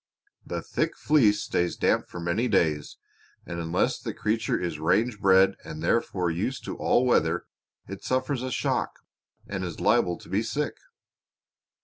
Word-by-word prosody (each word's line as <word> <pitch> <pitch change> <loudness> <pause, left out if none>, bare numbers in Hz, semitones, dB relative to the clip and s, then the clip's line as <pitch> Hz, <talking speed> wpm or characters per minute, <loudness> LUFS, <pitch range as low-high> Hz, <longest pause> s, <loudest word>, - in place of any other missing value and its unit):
The - - -5
thick - - -2
fleece 110 -9 +3
stays 90 0 0
damp - - +2
for 90 - -7
many 85 +9 0
days, 80 -9 +1 0.5
and 85 -1 -5
unless 85 +1 0
the - - -5
creature 110 +2 0
is 85 -4 -3
range 105 +8 +1
bred 95 -1 +5
and 80 0 -7
therefore 90 -2 +1
used 105 +11 -3
to - - -4
all 125 - +2
weather 85 -8 +2 0.4
it 100 +1 -8
suffers 130 0 0
a 130 - -3
shock, - - -1 0.5
and 95 -2 -4
is 85 -3 -5
liable 90 -1 +2
to - - -15
be 100 +3 0
sick. 145 +6 -2
95 Hz, 155 wpm, -27 LUFS, 85-115 Hz, 0.5 s, bred